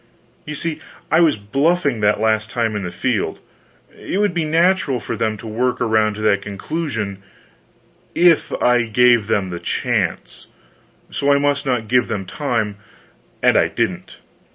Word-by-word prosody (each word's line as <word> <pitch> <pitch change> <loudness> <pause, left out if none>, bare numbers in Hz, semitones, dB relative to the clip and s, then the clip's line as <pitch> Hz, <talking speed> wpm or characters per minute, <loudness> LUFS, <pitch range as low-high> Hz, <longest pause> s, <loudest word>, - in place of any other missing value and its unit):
You 150 - -4
see, 160 +1 -4 0.3
I 160 - +5
was 165 -4 +4
"bluffing" 140 - 0
that 105 0 +2
last 110 0 +1
time 115 -3 -1
in 105 - -2
the - - -3
field; - - -2 0.6
it - - -4
would 205 -2 +1
be 170 -2 -1
natural 165 -4 +2
for 105 - -5
them 110 -1 -1
to 115 - -11
work 125 +3 -1
around 110 -3 +1
to 110 - -7
that 105 -2 +2
conclusion, 105 - -4 0.9
if 175 -2 +4
I 120 -1 +3
gave 120 -1 +4
them 95 -4 0
a 85 - -5
chance. - - -2 0.6
So 140 0 +1
I 140 - +5
must 145 0 0
not 120 -4 0
give 125 +1 +2
them 100 -3 -3
time; 110 -4 -2 0.7
and - - +4
I - - +4
didn't. - - -3
120 Hz, 160 wpm, -19 LUFS, 105-145 Hz, 0.9 s, I